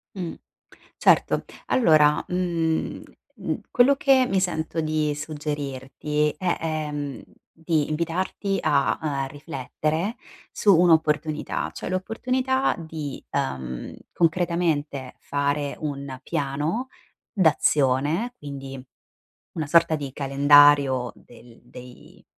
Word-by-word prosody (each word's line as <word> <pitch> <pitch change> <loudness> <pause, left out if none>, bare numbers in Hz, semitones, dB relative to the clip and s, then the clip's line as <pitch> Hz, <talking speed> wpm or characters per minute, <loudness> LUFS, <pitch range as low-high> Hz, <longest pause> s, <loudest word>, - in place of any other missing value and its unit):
Mh, 175 -4 -4 0.6
certo. - - +3 0.2
Allora, 155 -10 +4
mhmm, 170 -3 -1 0.3
mhmm, - - -4
quello 265 +3 +5
che 265 -2 +4
mi 195 - +2
sento 165 -3 -2
di 155 -1 0
suggerirti 150 -1 -3
è, 180 0 0
ehm, 150 -3 -3 0.3
di 160 -2 0
invitarti 175 +5 -2
a, 140 -1 +2
uhm, 140 -3 -2
riflettere 155 - -3 0.4
su 200 -3 +4
un'opportunità, 155 -3 +2
cioè - - -6
l'opportunità 255 +8 0
di, 160 -4 -6
uhm, 65 - -3 0.2
concretamente 165 -5 0
fare 145 0 -1
un 140 -3 -5
piano 150 - -2 0.4
d'azione, 155 - +2
quindi 135 -2 -8 0.7
una 155 -3 -3
sorta 165 +1 +4
di 140 -3 -5
calendario 140 -2 +5
del 120 -1 -17
dei 125 0 -14
150 Hz, 95 wpm, -24 LUFS, 140-170 Hz, 0.7 s, quello